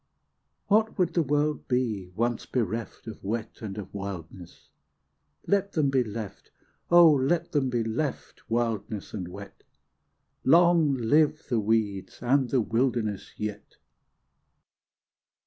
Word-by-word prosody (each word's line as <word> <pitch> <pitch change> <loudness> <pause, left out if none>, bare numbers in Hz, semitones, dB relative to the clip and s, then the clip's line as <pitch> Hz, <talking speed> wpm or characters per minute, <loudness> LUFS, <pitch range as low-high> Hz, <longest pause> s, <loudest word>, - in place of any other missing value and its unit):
What 215 +2 +2
would 180 -3 +1
the 170 - +3
world 150 0 0
be, 115 -7 -1
once 120 +2 -1
bereft 115 -2 -3
Of 110 -3 -9
wet 110 +3 -4
and 105 -2 -6
of 100 -3 -7
wildness? 95 -3 -8 0.7
Let 200 0 +1
them 145 -4 +2
be 130 -2 +3
left, 105 -3 -7 0.4
O 175 -2 +8
let 155 +5 +1
them 140 -3 +1
be 120 -2 0
left, 125 +3 -4
wildness 115 -3 -2
and 95 -4 -4
wet; 100 +2 -11 0.8
Long 165 -1 +5
live 150 +6 +2
the 120 -3 +2
weeds 105 -3 -1
and 130 +1 +2
the 130 -1 +2
wilderness 115 -3 -1
yet. 105 -1 -6
120 Hz, 125 wpm, -27 LUFS, 105-150 Hz, 0.8 s, O